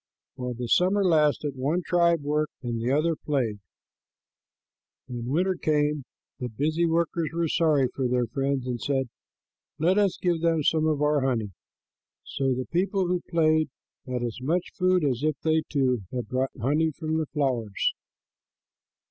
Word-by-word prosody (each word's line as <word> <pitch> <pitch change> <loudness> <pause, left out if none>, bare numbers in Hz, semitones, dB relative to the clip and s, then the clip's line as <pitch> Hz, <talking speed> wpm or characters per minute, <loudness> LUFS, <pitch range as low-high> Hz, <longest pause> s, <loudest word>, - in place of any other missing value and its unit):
While 125 -2 -4
the 120 0 -4
summer 190 - +3
lasted, 150 -4 +2
one 150 +7 0
tribe 170 -2 +3
worked 150 +1 -1
and 120 -2 -2
the 120 +3 0
other 155 +4 +2
played. 125 -9 -1 1.5
When 120 -2 -5
winter 180 +8 +1
came, 150 -4 0 0.3
the 125 -2 -3
busy 155 +8 0
workers 165 -1 0
were 170 0 0
sorry 155 -5 +3
for 130 -2 -1
their 125 0 +1
friends 135 +1 -1
and 125 -2 -3
said, 135 -3 0 0.7
"Let 175 +6 +3
us 200 -3 +2
give 175 -3 0
them 165 -2 +2
some 155 +2 +2
of 150 -2 +1
our 150 -1 +3
honey." 120 -6 0 0.7
So 135 -2 -1
the 130 0 -3
people 190 +2 0
who 180 -1 0
played 155 -2 +3 0.4
had 125 -1 -2
as 120 +1 -4
much 170 +7 -1
food 185 -2 +2
as 130 -4 0
if 155 -1 0
they, 160 0 +2
too, 130 -5 +1
had 125 -3 -3
brought 130 +1 0
honey 150 +7 +2
from 160 +1 -2
the 155 - -2
flowers. 125 -9 0
150 Hz, 160 wpm, -26 LUFS, 130-165 Hz, 1.5 s, summer